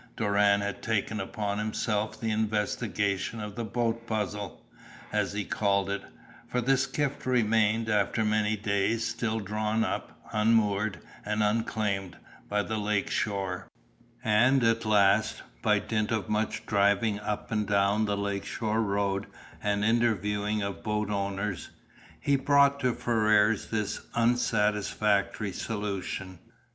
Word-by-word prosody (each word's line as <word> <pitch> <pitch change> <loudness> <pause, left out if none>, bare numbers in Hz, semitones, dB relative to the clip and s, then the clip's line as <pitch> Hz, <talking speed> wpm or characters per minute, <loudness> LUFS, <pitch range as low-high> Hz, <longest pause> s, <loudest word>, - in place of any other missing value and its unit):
Doran 100 -1 +3
had 100 0 -4
taken 110 -1 -1
upon 100 +1 -3
himself 105 0 -1
the 110 -1 -1
investigation 105 -1 -1
of 105 -1 -5
the 115 - -3
"boat 115 +1 -2
puzzle," 105 -3 -3 0.5
as - - 0
he 105 -1 -2
called 100 -1 +1
it, 100 - -2 0.5
for 125 - -1
the 135 +3 +3
skiff 140 +1 -1
remained, 115 -2 +2
after 105 +1 +1
many 105 0 +2
days, 105 +3 0
still 115 -1 -1
drawn 105 +2 -1
up, - - -4
unmoored 105 -3 +2 0.3
and 105 +1 0
unclaimed, 105 -4 -1 0.3
by 105 0 +1
the 110 0 -3
lake 105 -1 0
shore; 95 -3 -2 0.6
and 125 +4 +4
at 115 0 +2
last, 105 0 +3 0.2
by - - +3
dint 110 -1 -1
of 110 -2 -1
much 110 0 -1
driving 100 +1 +2
up 105 0 -4
and 105 -2 0
down 100 +1 +2
the 100 -1 -1
lake 100 -1 -2
shore 110 0 -1
road 100 -1 0 0.3
and 105 0 0
interviewing 105 -2 +1
of 100 0 -4
boat 105 -1 -1
owners, 100 -1 -2 0.5
he 140 - +2
brought 140 0 +4
to 125 -3 +1
Ferrars 110 -2 +2
this 105 -2 -2
unsatisfactory 105 -3 +1
solution. 100 -4 -4
105 Hz, 130 wpm, -28 LUFS, 100-110 Hz, 0.6 s, and